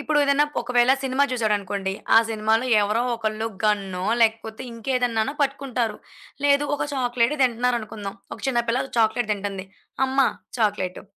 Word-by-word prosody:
ఇప్పుడు 295 +1 +1
ఏదన్నా 280 +1 +3 0.2
ఒకవేళ 245 +1 +3
సినిమా 265 +1 +1
జూసాడు 225 -4 +1
అనుకోండి, 195 -1 -3 0.2
ఆ - - +11
సినిమాలో 220 +2 +1 0.2
ఎవరో 210 +3 +1
ఒకళ్ళు, 220 -1 -2 0.2
గన్నో 195 -3 0 0.2
లేకపోతే 220 -1 +1
ఇంకేదన్నానో 245 0 -1
పట్టుకుంటారు. 265 -6 -1 0.5
లేదు, 285 0 +4
ఒక - - -2
చాక్లేటే 245 +1 +1
తింటన్నారనుకుందాం. 230 -4 -1 0.2
ఒక - - -13
చిన్న 245 -3 +2
పిల్ల 245 +3 +1 0.2
చాక్లేట్ 225 0 +2
తింటంది. 200 -2 -4 0.4
అమ్మ! 265 +1 -3 0.4
చాక్లేటు. 205 -4 -1
230 Hz, 135 wpm, -23 LUFS, 215-255 Hz, 0.5 s, ఆ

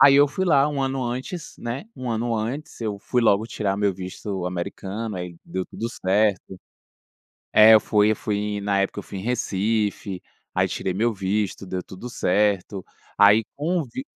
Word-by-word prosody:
Aí 140 -1 +8
eu 145 +1 +7
fui 185 +7 -2
lá 140 -3 +5
1 145 -2 -2
ano 135 -1 -1
antes, 130 +8 -5
né, 120 - -4
1 125 -2 -5
ano 115 +1 -1
antes, 125 +7 -4
eu 105 -3 -3
fui 125 +4 0
logo 110 -1 +3
tirar 100 -3 -2
meu 100 -1 +2
visto 95 0 -5
americano, 100 +4 -4
aí 90 -1 -6
deu 95 0 -4
tudo 115 - -5
certo. 95 -2 0 0.9
É, 110 +1 +9
eu 110 - +8 0.2
eu 110 +1 +4
fui, 105 -1 -2
na 100 -1 +1
época, 100 - -3
eu - - -12
fui 100 - -8
em - - -6
Recife, 105 -4 -1 0.3
aí - - +3
tirei 95 - -2
meu 115 +3 +1
visto, 100 0 -2
deu 90 0 -3
tudo 95 +7 -9
certo. 100 -2 0 0.3
Aí 105 +2 +6
com 170 +5 0
o - - -3
vi 195 - -7
105 Hz, 180 wpm, -24 LUFS, 95-120 Hz, 0.9 s, É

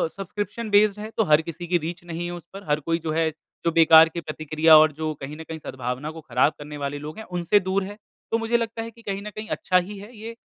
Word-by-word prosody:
Subscription 205 +3 -5
based 205 0 +4
है, 215 +1 -6
तो 220 - +4
हर 150 +1 +6
किसी 170 +1 -7
की 175 - +3
रीच 170 +2 -6
नहीं 170 0 -5
है 175 - -4
उस 175 -1 -9
पर, 195 +1 -9
हर 150 +1 +2
कोई 165 +3 -1
जो 160 -1 -3
है, 160 0 +1
जो 165 +2 -5
बेकार 160 0 +7
की 170 +1 -5
प्रतिक्रिया 155 +1 +4
और 155 0 +6
जो 155 +1 -3
कहीं 145 +3 -6
न 160 - -7
कहीं 160 0 -7
सद्भावना 130 +3 -5
को 160 0 -10
खराब 125 +3 +2
करने 150 0 -8
वाले 145 0 -3
लोग 150 +6 -8
है, 220 - -7
उनसे 180 +2 +2
दूर 190 +1 -1
है। 205 +2 -8 0.3
तो 225 - +3
मुझे 230 +1 +1
लगता 230 0 -3
है 230 0 -6
कि 230 - -18
कहीं 200 -2 -4
न - - -3
कहीं 215 +1 -6
अच्छा 185 - +2
ही 195 +3 -2
है 215 +5 -12
ये 225 +2 -8
170 Hz, 270 wpm, -24 LUFS, 155-205 Hz, 0.3 s, बेकार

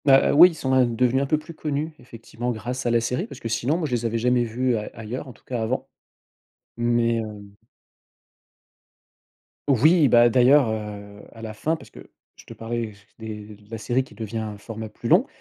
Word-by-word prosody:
Bah, 135 -1 +5
oui, 170 +5 +9
ils 170 - -9
sont, 130 -3 -1
hein, 130 -1 +5
devenus 125 +3 +1
un 140 - -1
peu 155 - +2
plus 155 +2 -10
connus, 155 0 -3
effectivement, 120 0 -7
grâce 120 +3 -4
à - - +2
la 120 0 +3
série 125 +2 -2
parce 140 - -10
que, - - -5
sinon, 130 +7 0
moi, 175 - -2
je - - -8
les 120 -1 -1
avais 115 0 0
jamais 125 +1 +2
vus 120 +2 0
ail 105 -1 -4
ailleurs, 115 +5 -6
en 130 - -10
tout - - -25
cas, 125 -3 -3
avant. 115 +4 -2 0.9
Mais 120 0 +2
hem 105 -3 -6 2.1
Oui, 150 +4 +5
bah, 120 -1 +6
d'ailleurs, 130 +2 +5
heu, 105 -2 -6
à 115 - -12
la 110 -1 -6
fin, 155 +9 -1
parce - - -14
que - - -13 0.3
je - - -17
te - - -10
parlais 115 -1 -4 0.3
des 110 -2 -7
de 105 0 -22
la 115 - -5
série 120 +4 0
qui 115 - -17
devient 110 +1 -4
un 105 -2 -5
format 110 +1 -7
plus 110 +2 -7
long 190 - +5
120 Hz, 210 wpm, -24 LUFS, 110-130 Hz, 2.1 s, oui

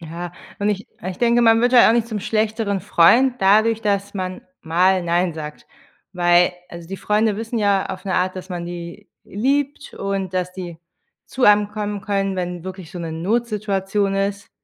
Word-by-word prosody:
Ja, 170 +1 -7 0.3
und 205 +1 0
ich 205 0 -2
und 185 - -5
ich 185 - -6
denke, 240 0 +3
man 225 0 +5
wird 245 +1 +2
halt 245 - +7
auch 225 - +5
nicht 235 -1 +1
zum 210 -3 -3
schlechteren 215 -2 -1
Freund 245 +11 +4
dadurch, 220 +3 +4
dass 200 -1 -1
man 185 -1 -4 0.2
mal 180 +3 +2
„nein“ 175 0 0
sagt, 150 -1 -8 0.5
weil 175 0 +3 0.2
also 170 -1 -10
die 195 - -5
Freunde 210 +2 +1
wissen 225 +1 -3
ja 200 -2 +2
auf - - -7
'ne 190 - -2
Art, 185 +1 0
dass 185 +1 -8
man 175 -2 -5
die 175 +3 -8 0.2
liebt 280 +7 -2
und 195 -2 -3
dass 180 0 -2
die 175 -3 -8 0.5
zu 260 - -1
einem 210 0 +5
kommen 210 -1 -4
können, 195 -1 -1
wenn 180 -1 -4
wirklich 185 -3 -8
so 180 - -8
'ne 165 -1 -5
Notsituation 200 0 -1
ist. 200 0 -2
195 Hz, 190 wpm, -21 LUFS, 180-215 Hz, 0.5 s, halt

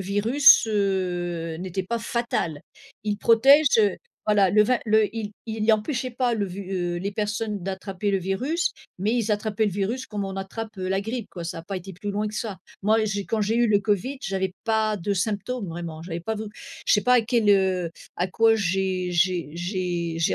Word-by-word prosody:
virus, 220 +8 +5
heu, 175 -5 -1
n'était 185 +1 -3
pas 235 +5 -2
fatal. 225 -11 -2 0.4
Il 210 -1 0
protège, 270 +8 +6
heu 205 -3 +3 0.3
voilà, 205 -3 +4
le 210 +2 +5
va 250 +3 +2
le 215 -1 +3
il 210 -2 -4
il 220 -1 -3
y 220 - +5
empêchait 250 +4 -1
pas 245 0 0
le 205 -3 -1
ve 185 +1 -8
heu, 180 -3 -2
les 195 +3 -3
personnes 210 -1 -2
d'attraper 195 +1 -3
le 195 - +2
virus, 250 - -1 0.3
mais 205 +4 0
ils 225 -3 +1
attrapaient 210 +1 0
le 205 - 0
virus 220 +7 -2
comme 210 -4 -4
on 195 0 -5
attrape, 210 +3 -6
heu, 185 - -3
la 195 +1 +1
grippe, 225 +2 -4
quoi. 175 - -7
Ça 165 0 -5
a - - -7
pas 190 +3 -5
été 190 +2 -7
plus 205 +2 -5
loin 210 +1 -1
que 210 - -9
ça. 215 -4 -4 0.2
Moi 220 +2 +3
j'ai 200 -1 -2
quand 220 +2 -1
j'ai 215 +2 +1
eu 240 0 +4
le 205 -2 +3
covid, 210 +7 -1
j'avais 190 -4 -2
pas 220 -2 +1
de 200 +3 -1
symptômes, 210 +4 -2
vraiment, 165 -1 -6
j'avais 170 0 -5
pas 220 +6 -3
vou 215 0 -5 0.4
je - - +4
sais 205 - +5
pas 250 +4 +4
à 245 - +5
quel, 230 -1 +1
heu 190 -4 +3 0.3
à 180 - 0
quoi 225 +4 +4
j'ai 185 -2 0
j'ai 175 -2 +1
j'ai 175 -2 -2
j'ai 165 - +2
205 Hz, 210 wpm, -25 LUFS, 185-220 Hz, 0.4 s, protège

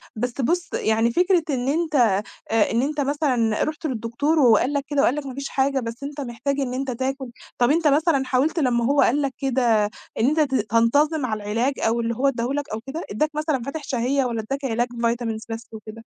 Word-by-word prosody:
بس 245 +4 -3
بُصّ 345 +7 -1
يعني 225 +2 +1
فكرة 360 +4 +3
إن 255 -3 -1
أنت 310 +2 0
آآ 220 -1 +1
إن 230 - +2
أنت 290 +2 -1
مثلًا 265 -6 +1
رُحت 310 +1 -4
للدكتور 265 +4 0
وقال 250 +1 +4
لك 285 -1 0
كده 290 0 +1
وقال 260 - +3
لك 295 -1 -4
ما 265 - -6
فيش 280 0 -5
حاجة 270 0 +1
بس 235 +1 -6
أنت 285 +1 -5
محتاج 265 +3 -3
إن 260 -3 -2
أنت 265 +1 -2
تاكل، 265 +1 -3 0.3
طَب 245 +2 +3
أنت 325 +1 +2
مثلًا 295 -1 +3
حاولت 275 +6 +1
لمّا 240 -5 +1
هو 280 +3 +3
قال 285 +5 +3
لك 275 -2 -1
كده 245 -5 +2 0.3
إن 225 - +3
أنت 305 +3 +2
ت 280 -3 +2
تنتظِم 250 +7 +2
على 215 -3 -3
العلاج، 230 +7 0
أو 230 +1 +1
اللي 230 0 -1
هو 270 +4 +1
ادّاه 240 -3 0
لك 290 0 -3
أو 215 - -2
كده، 315 +5 -5
ادّاك 265 +10 0
مثلًا 305 -3 0
فاتِح 290 +4 -5
شهية 265 0 0
والَّا 235 -2 -2
اداك 275 0 -3
علاج 240 -1 0
vitamins 235 -1 -2
بس 225 0 -6
وكده؟ 220 +1 -10
265 Hz, 215 wpm, -23 LUFS, 230-285 Hz, 0.3 s, وقال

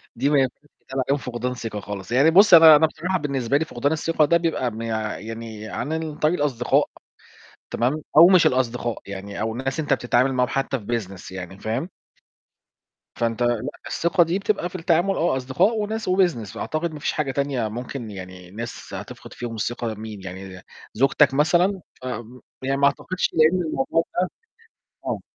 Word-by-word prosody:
دي 135 +5 +1
ما 145 -2 +4
ينفعش 130 +2 -1 0.2
يتقال 135 -1 -3
عليهم 140 +1 +2
فقدان 125 -1 -4
ثقة 115 -4 -5
خالص. 100 +1 -7
يعني 140 +6 +5
بُصّ 195 +2 +6
أنا 160 -2 +10
أنا 160 +1 +5
بصراحة 180 +4 -2
بالنسبة 140 -2 0
لي 160 - -1
فقدان 140 +1 -1
الثقة 160 0 +2
ده 170 +3 +4
بيبقى 160 -8 -1
مي 115 +1 -6 0.4
يعني 110 -1 -7
عن 140 +8 -4
ال 160 -2 -4
طريق 155 +4 +2
الأصدقاء، 125 -5 +1 0.8
تمام؟ 140 +6 0
أو 170 +3 +10
مش 185 -3 +6
الأصدقاء 120 -3 0
يعني، 100 +1 -7
أو 110 0 -1
الناس 130 +5 -3
أنت 145 -2 -1
بتتعامل 125 +1 +1
معاهم 125 -1 +1
حتى 135 -1 -1
في 105 - -13
business 95 -6 -4
يعني، 95 +1 -7
فاهم؟ 120 +10 -2 1.3
فانت 115 0 -1
لأ، 120 -2 +2 0.3
الثقة 170 +1 +2
دي 175 +4 -1
بتبقى 200 -3 -1
في 185 - -13
التعامل 175 +2 +1
آه 160 -5 +1
أصدقاء 170 - +1
وناس 220 0 -2
وbusiness، 170 - +1
فأعتقد 155 +7 -3
ما 150 - -7
فيش - - -1
حاجة 150 -3 -2
تانية 135 -5 -1
ممكن 120 0 -6
يعني 90 -2 -10
ناس 115 +2 -7
هتفقد - - -8
فيهم 120 -2 -6
الثقة، 115 0 -3
مين 105 -2 -8
يعني؟ 95 0 -8 0.3
زوجتك 135 +4 +3
مثلًا، 175 +6 +2 0.2
امم، 125 0 -6 0.2
يعني 135 +1 -1
ما 140 - +3
أعتقدش 185 +5 0
لأن 160 +3 +4
الموضوع 155 0 0 0.2
ده 185 - 0 0.8
آه. - - -2
135 Hz, 175 wpm, -23 LUFS, 115-160 Hz, 1.3 s, أنا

